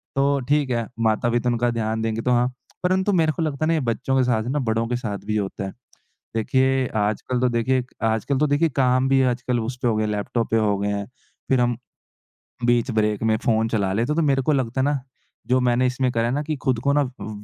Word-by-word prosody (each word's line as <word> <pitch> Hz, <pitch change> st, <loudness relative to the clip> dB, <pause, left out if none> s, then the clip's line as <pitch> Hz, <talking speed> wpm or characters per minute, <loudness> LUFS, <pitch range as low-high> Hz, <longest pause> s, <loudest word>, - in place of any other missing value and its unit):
तो 140 Hz, +1 st, +2 dB
ठीक 145 Hz, -2 st, +2 dB
है, 115 Hz, -2 st, -1 dB
माता-पिता 115 Hz, +2 st, +1 dB
उनका 120 Hz, 0 st, +1 dB
ध्यान 110 Hz, -1 st, -2 dB
देंगे 110 Hz, 0 st, -1 dB
तो 125 Hz, -, 0 dB
हाँ। 120 Hz, 0 st, +3 dB, 0.4 s
परंतु 190 Hz, +2 st, +2 dB
मेरे 160 Hz, -3 st, +3 dB
को 150 Hz, -, -4 dB
लगता 155 Hz, -1 st, -1 dB
है -, -, 0 dB
ना 165 Hz, -, +3 dB
ये 160 Hz, -, +2 dB
बच्चों 130 Hz, +1 st, -1 dB
के 130 Hz, -, +4 dB
साथ 120 Hz, -3 st, +1 dB
जो 110 Hz, -, -6 dB
है 130 Hz, -, -1 dB
ना 150 Hz, -, 0 dB
बड़ों 115 Hz, -2 st, 0 dB
के 125 Hz, -, -1 dB
साथ 110 Hz, -5 st, -4 dB
भी 110 Hz, 0 st, -1 dB
होता 100 Hz, -1 st, -3 dB
है। 95 Hz, -, -6 dB, 0.6 s
देखिए, 130 Hz, +3 st, +2 dB
आजकल 110 Hz, +4 st, -1 dB
तो 125 Hz, -, +3 dB
देखिए 125 Hz, +2 st, +1 dB, 0.2 s
आजकल 110 Hz, +5 st, 0 dB
तो 150 Hz, -, +3 dB
देखिए 145 Hz, +3 st, +2 dB
काम 130 Hz, -1 st, +2 dB
भी 135 Hz, 0 st, +4 dB
आजकल 125 Hz, -1 st, 0 dB
उसपे 125 Hz, +2 st, -3 dB
हो 115 Hz, -, +2 dB
गए 110 Hz, -, +1 dB
हैं, -, -, -2 dB
लैपटॉप 105 Hz, +3 st, -2 dB
पे 115 Hz, -, +3 dB
हो 105 Hz, -2 st, +2 dB
गए 100 Hz, -, -1 dB
हैं, 100 Hz, 0 st, -2 dB, 0.4 s
फ़िर 130 Hz, -2 st, +3 dB
हम 120 Hz, -1 st, +1 dB, 0.9 s
बीच 120 Hz, +1 st, +2 dB
ब्रेक 105 Hz, -1 st, 0 dB
में 110 Hz, -1 st, +3 dB
फ़ोन 110 Hz, -1 st, +2 dB
चला 100 Hz, -4 st, 0 dB
लेते 120 Hz, +9 st, 0 dB
तो 165 Hz, -, +2 dB
मेरे 140 Hz, -3 st, +2 dB
को 145 Hz, -, +1 dB
लगता 130 Hz, -1 st, 0 dB
ना 140 Hz, +1 st, +1 dB, 0.5 s
जो 130 Hz, +1 st, +3 dB
मैंने 125 Hz, 0 st, +2 dB
इसमें 125 Hz, 0 st, 0 dB
करा 115 Hz, -1 st, 0 dB
है 120 Hz, -, 0 dB
ना 145 Hz, -, 0 dB
कि 155 Hz, 0 st, -2 dB
ख़ुद 130 Hz, -4 st, +2 dB
को 140 Hz, -, +4 dB
ना 145 Hz, -, +3 dB, 0.2 s
अ -, -, -5 dB
125 Hz, 245 wpm, -23 LUFS, 110-135 Hz, 0.9 s, के